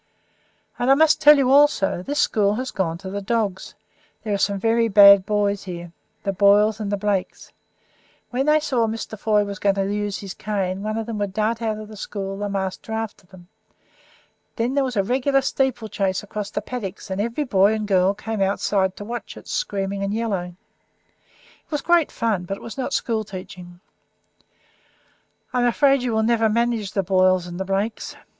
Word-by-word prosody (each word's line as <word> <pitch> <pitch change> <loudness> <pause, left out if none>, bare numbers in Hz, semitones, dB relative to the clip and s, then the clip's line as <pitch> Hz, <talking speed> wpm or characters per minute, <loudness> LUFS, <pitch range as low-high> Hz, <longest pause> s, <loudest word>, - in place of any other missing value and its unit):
And, 245 - +1
I 270 - +7
must 315 +1 +4
tell 295 0 +8
you 265 -2 +2
also 280 -11 +4
this 285 +10 -4
school 205 -1 +2
has 255 +3 -4
gone 170 -4 -2
to 190 +1 -8
the 200 +1 -4
dogs; 200 -3 -2 0.5
there 215 -2 -2
are - - +1
some 200 0 +1
very 230 +2 +2
bad 200 -2 +7
boys 205 -1 0
here 175 -2 -7 0.3
the 195 - -1
Boyles 205 +2 +4
and 205 -2 -3
the 205 - 0
Blakes. 200 -2 -3 0.8
When 260 +3 -1
they 305 0 +5
saw 255 -7 0
Mr. 220 0 -5
Foy 210 0 +1
was 200 -1 -6
going 200 -1 +2
to 195 0 -1
use 205 -1 -2
his 195 -2 -7
cane 195 -2 -3
on 215 - -2
them 225 0 -3
they 230 - -6
would 205 -3 -3
dart 220 +2 -1
out 220 -2 -1
of 215 0 -8
the 215 - -11
school, 195 -1 -5
the 205 0 -3
master 195 +2 -4
after 220 -4 -5
them. 180 -2 -16 1.1
Then 235 +3 -1
there 280 0 +2
was 250 -4 -3
a 200 - +3
regular 265 +5 +1
steeplechase 225 -9 -1
across 205 0 -5
the - - -3
paddocks, 210 -4 -6
and 190 +1 -1
every 235 +7 -2
boy 200 -6 +3
and 215 -1 -3
girl 190 0 +3
came 220 0 -4
outside 195 -1 0
to 205 - -8
watch 240 +2 -6
it, - - -13
screaming 195 - -2
and 200 +1 -2
yelling. 190 -6 -3 1.1
It - - -42
was 295 -2 -1
great 345 -3 +3
fun, 210 -6 -1
but 195 +2 -4
it - - -14
was 230 - -8
not 265 - -3
school 225 -2 -1
teaching. 185 -3 -10 1.7
I 250 - +1
am 245 - +3
afraid 275 +2 +3
you 245 -1 -1
will 220 0 +1
never 225 -1 +2
manage 230 -3 0
the 195 - 0
Boyles 185 -1 +3
and 175 0 -7
the 190 - -2
Blakes. 195 +4 -3
210 Hz, 195 wpm, -22 LUFS, 195-230 Hz, 1.7 s, tell